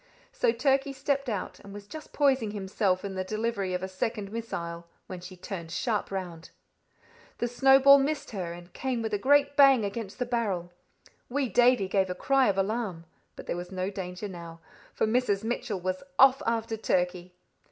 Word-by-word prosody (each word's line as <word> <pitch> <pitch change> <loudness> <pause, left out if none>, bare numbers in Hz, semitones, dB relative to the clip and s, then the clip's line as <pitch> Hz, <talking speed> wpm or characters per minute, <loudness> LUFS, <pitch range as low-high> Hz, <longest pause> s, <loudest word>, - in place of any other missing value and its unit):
So - - +2
Turkey 270 +3 +1
stepped 275 0 -1
out, 205 -4 -4
and 200 0 -11
was 205 -1 -9
just 310 +9 -10
poising 270 -6 +2
himself 195 -2 -1
in 195 - -4
the 185 0 -2
delivery 215 -2 -2
of 180 - -3
a - - -2
second 200 +2 -3
missile, 170 -7 -5 0.2
when 185 -2 -8
she 185 +1 -10
turned 175 -2 -7
sharp 210 +4 -1
round. 180 -4 -6 0.9
The 240 - -1
snowball 270 +3 +6
missed 285 +1 -2
her, 185 -6 -4
and 175 +1 -11
came 255 -3 -2
with 220 -1 -3
a 205 - +1
great 285 +3 +3
bang 270 -6 +6
against 200 0 -5
the 250 - -1
barrel. 205 -8 -2 0.6
Wee 265 0 -1
Davie 245 -4 +4
gave 190 -1 +1
a 180 - -3
cry 270 +6 +3
of 195 - 0
alarm, 195 -4 -2 0.3
but - - -10
there - - -2
was 175 +1 -6
no 185 +1 -2
danger 185 +1 -5
now, 170 -3 -9 0.3
for - - 0
Mrs. 220 -3 +1
Mitchell 225 -3 -2
was 185 +1 -3 0.2
off 270 +1 +6
after 225 -1 -1
Turkey. 180 -3 -1
205 Hz, 185 wpm, -28 LUFS, 185-250 Hz, 0.9 s, snowball